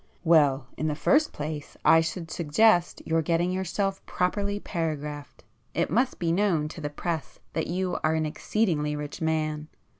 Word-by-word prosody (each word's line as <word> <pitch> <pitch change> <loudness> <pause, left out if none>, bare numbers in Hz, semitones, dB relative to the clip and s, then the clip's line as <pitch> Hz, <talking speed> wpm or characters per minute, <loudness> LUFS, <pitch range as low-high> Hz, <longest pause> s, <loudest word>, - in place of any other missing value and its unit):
"Well, 145 -6 +4
in 155 - -1
the 150 - 0
first 295 - +3
place 150 0 -6
I 165 - +7
should 165 0 -4
suggest 175 +3 +3
your 165 0 +2
getting 170 +3 +1
yourself 190 +1 -2
properly 200 +3 -1
paragraphed. 150 -6 -4 0.3
It - - 0
must 250 +7 +1
be 170 -2 0
known 170 -5 +2
to 160 - -9
the 145 - -2
press 160 +1 -4 0.2
that 160 - -1
you 180 +1 -1
are 155 +1 +2
an 160 0 0
exceedingly 155 -2 0
rich 150 +1 -6
man. 155 -1 -1
165 Hz, 160 wpm, -27 LUFS, 150-185 Hz, 0.3 s, I